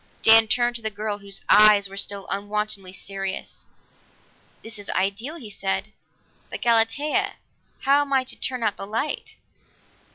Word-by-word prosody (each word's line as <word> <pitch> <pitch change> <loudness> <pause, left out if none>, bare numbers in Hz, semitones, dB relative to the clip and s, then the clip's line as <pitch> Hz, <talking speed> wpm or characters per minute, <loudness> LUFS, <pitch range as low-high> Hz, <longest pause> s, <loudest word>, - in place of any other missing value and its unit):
Dan 225 0 +7
turned 240 +1 +1
to - - -13
the 220 - -2
girl, 210 0 -4
whose 200 -1 -2
eyes 210 -1 +6
were 195 - -11
still 200 0 -1
unwontedly 205 -1 -3
serious. 195 0 -6 1.0
"This 225 -1 -7
is 205 - -10
ideal," 200 - -1
he 235 -11 -9
said, 200 +2 -3 0.6
"but, - - -6
Galatea, 285 - +2 0.5
how 280 +2 +4
am 285 -1 -4
I 265 -1 +3
to 255 - -10
turn 255 -2 -3
out 210 -2 0
the 195 - -7
light?" 230 +8 -3
215 Hz, 155 wpm, -24 LUFS, 200-240 Hz, 1.0 s, Dan